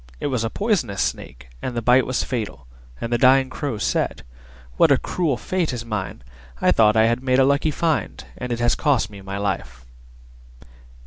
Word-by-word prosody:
It - - -5
was 120 -3 0
a 115 - -1
poisonous 165 - -1
Snake, - - -4
and 125 - -4
the 120 - -1
bite 125 +2 +4
was 130 -1 -1
fatal, 110 - -4 0.3
and 115 +1 -3
the 120 - +1
dying 130 +1 +4
Crow 140 -6 -3
said, - - -1 0.5
"What - - +5
a - - +6
cruel 160 -8 -1
fate 175 -3 -2
is 120 -1 -5
mine! 105 - -5 0.4
I - - +3
thought 110 -1 +4
I 110 - +5
had 120 +2 +1
made 130 -1 +1
a 135 - +5
lucky 140 +3 +2
find, 160 +1 -1
and 125 -1 -6
it 120 - -2
has 120 0 +2
cost 140 -8 +1
me 100 -1 -11
my 95 +1 -6
life!" 65 -11 -4
120 Hz, 195 wpm, -22 LUFS, 105-135 Hz, 0.5 s, a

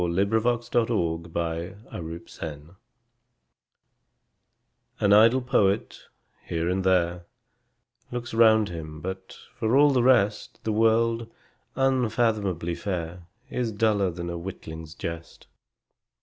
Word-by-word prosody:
Coventry 90 +3 +1 0.5
Patmore 105 -9 +1
The 85 +1 -13 0.6
Revelation 80 -1 -8 2.2
AN 100 - +4
idle 115 +5 +6
poet, 100 -5 0 0.4
here 85 0 -2
and 95 +1 0
there, 90 -2 +1 0.8
Looks 120 -1 -5
round 110 -2 +5
him, 80 -2 -7
but, 95 +2 -7 0.2
for 115 +4 +1
all 145 0 +6
the 130 -2 +3
rest, 115 -5 +2
The 110 - -1
world, 115 +1 +2 0.5
unfathomably 115 -9 +1
fair, 85 -2 -5 0.2
Is 120 -3 -1
duller 105 -3 +2
than 85 0 -5
a 85 - -4
witling's 80 -3 -8
jest. 85 0 -7
95 Hz, 105 wpm, -26 LUFS, 85-115 Hz, 2.2 s, idle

